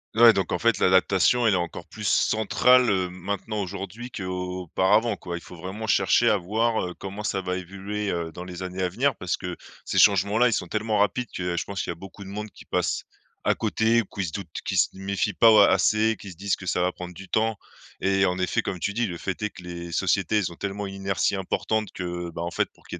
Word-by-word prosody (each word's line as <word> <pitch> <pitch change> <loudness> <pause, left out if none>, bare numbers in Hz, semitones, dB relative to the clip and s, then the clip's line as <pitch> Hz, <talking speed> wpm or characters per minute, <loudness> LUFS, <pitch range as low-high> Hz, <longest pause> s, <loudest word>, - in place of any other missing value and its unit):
Ouais 115 0 +8
donc 95 -3 -1
en 90 - +1
fait 115 +2 +2
l'adaptation 95 +6 +4
elle 105 - +4
est - - +3
encore 85 -1 -4
plus - - -10
centrale, 125 +3 +4
heu, 95 -2 +1
maintenant 100 +3 -4
aujourd'hui 100 +5 -6
qu'auparavant 95 +2 0
quoi? 85 -2 -5
Il - - -9
faut 90 - -12
vraiment 95 +6 -6
chercher 105 +3 +4
à 105 - +3
voir, 110 +5 0
heu, 90 -1 -4
comment 100 +2 -7
ça 95 -2 -1
va 90 0 -2
évoluer, 100 +3 -4
heu, 85 -2 -2
dans 90 - -8
les 90 0 -7
années 95 0 -4
à 90 - +1
venir. 130 +8 +1
Parce 90 - -2
que 90 -1 -5 0.3
ces - - 0
changements 100 +2 +4
là 125 - +6
ils 115 - +1
sont 90 - -1
tellement 110 +2 -1
rapides 105 +5 +1
que 90 -1 -2
je - - -1
pense 100 -2 -4
qu'il - - -3
y - - -3
a - - -15
beaucoup 95 +3 -11
de 95 - -10
monde 105 +2 -5
qui - - -15
passe - - -1 0.4
à - - +3
côté 115 +1 +2
ou - - -8
qui 95 0 -4
se 85 - -5
doutent, 85 -6 -6
qui - - -2
se - - +4
méfient 100 +1 -1
pas 115 - +6
au 110 - +7
assez, 110 +2 +4
qui 100 - -9
se - - -12
disent 100 +3 -1
que 90 - -10
ça 90 - 0
va 90 +1 +2
prendre 90 -1 -8
du 95 +2 -11
temps 110 0 +1 0.4
et 95 0 +3
en 90 -1 0
effet 90 -4 0
comme 90 - -4
tu 100 - -1
dis, 115 +2 0
le 85 -3 -5
fait 95 +3 -4
est 105 - 0
que 90 - -13
les 85 -1 -7
sociétés 95 +3 +1
elles 95 - -2
ont - - -10
tellement 100 +1 -4
une 95 - -7
inertie 95 +1 0
importante 105 +3 -1
que, 90 -1 -4
ben, 85 - -6
en 85 +1 -3
fait - - 0
pour - - -26
qu'il - - -6
y - - -17
95 Hz, 255 wpm, -25 LUFS, 90-105 Hz, 0.4 s, Ouais